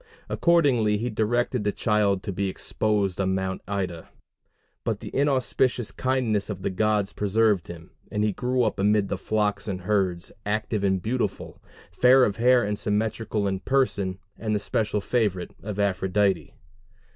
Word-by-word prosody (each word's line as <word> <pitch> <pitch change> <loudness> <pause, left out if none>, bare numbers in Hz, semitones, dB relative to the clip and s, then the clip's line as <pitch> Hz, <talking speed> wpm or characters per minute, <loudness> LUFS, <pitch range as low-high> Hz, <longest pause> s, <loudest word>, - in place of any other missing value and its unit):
Accordingly 135 -12 +3
he 120 +3 -2
directed 120 +2 0
the 105 - +1
child 100 -3 +1
to 100 - -4
be 100 +1 -1
exposed 100 -1 -1
on 95 0 +1
Mount 95 0 -2
Ida; 95 -5 -3 0.7
but - - -1
the - - -9
inauspicious 130 -3 +1
kindness 120 -6 0
of 95 -3 -5
the - - 0
gods 105 +1 +1
preserved 105 -2 +1
him; 85 0 -10 0.2
and 105 -1 0
he 105 - +2
grew 125 +5 0
up 110 -3 -1
amid 105 0 +2
the - - -1
flocks 105 0 -1
and 95 -3 -3
herds, 90 -3 0
active 105 0 -1
and 95 -2 +1
beautiful, 125 +3 -3 0.3
fair 125 +8 +5
of 100 -5 +1
hair 125 +1 +4
and 105 0 -2
symmetrical 105 0 -1
in 95 -1 -1
person, 100 -8 0 0.2
and 110 -1 -1
the - - +1
special 105 +1 -1
favorite 100 -6 -1
of 105 0 -5
Aphrodite. 100 0 +1
105 Hz, 155 wpm, -25 LUFS, 95-115 Hz, 0.7 s, fair